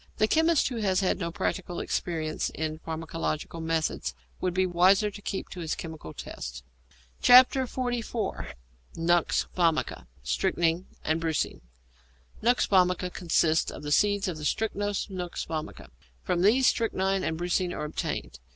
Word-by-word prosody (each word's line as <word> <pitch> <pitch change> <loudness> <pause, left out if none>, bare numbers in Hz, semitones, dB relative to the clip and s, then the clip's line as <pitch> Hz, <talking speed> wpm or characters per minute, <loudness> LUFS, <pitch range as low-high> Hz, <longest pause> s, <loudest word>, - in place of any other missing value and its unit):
The 215 - +3
chemist 320 +2 +3
who 245 - -4
has 195 -3 +1
had 190 - +1
no 170 -2 -2
practical 175 0 -3
experience 160 -3 -2
in 155 0 -3
pharmacological 160 0 -4
methods 160 - -1 0.2
would 185 - 0
be 185 0 +3
wiser 185 +4 +4
to 205 - -10
keep 200 -1 -4
to 180 - -8
his 165 -2 -2
chemical 160 - -7
tests. 65 -4 -7 0.6
XLIV. 245 -2 +3 0.4
NUX 170 0 +2
VOMICA, 165 - +1 0.2
STRYCHNINE, 165 - 0 0.2
AND 160 +1 0
BRUCINE 160 -2 -1 0.8
=Nux 240 +3 +4
Vomica= 180 -1 +2
consists 165 -2 +2
of - - -8
the 150 - -4
seeds 205 +4 +3
of 175 -4 -3
the 155 - -8
Strychnos 205 +3 -1
nux 180 -2 -4
vomica. 155 - -5 0.3
From 175 - 0
these 235 +7 +4
strychnine 195 -5 +1
and 160 - -1
brucine 175 +1 0
are 150 - -4
obtained. 105 - -4
175 Hz, 140 wpm, -28 LUFS, 160-205 Hz, 0.8 s, wiser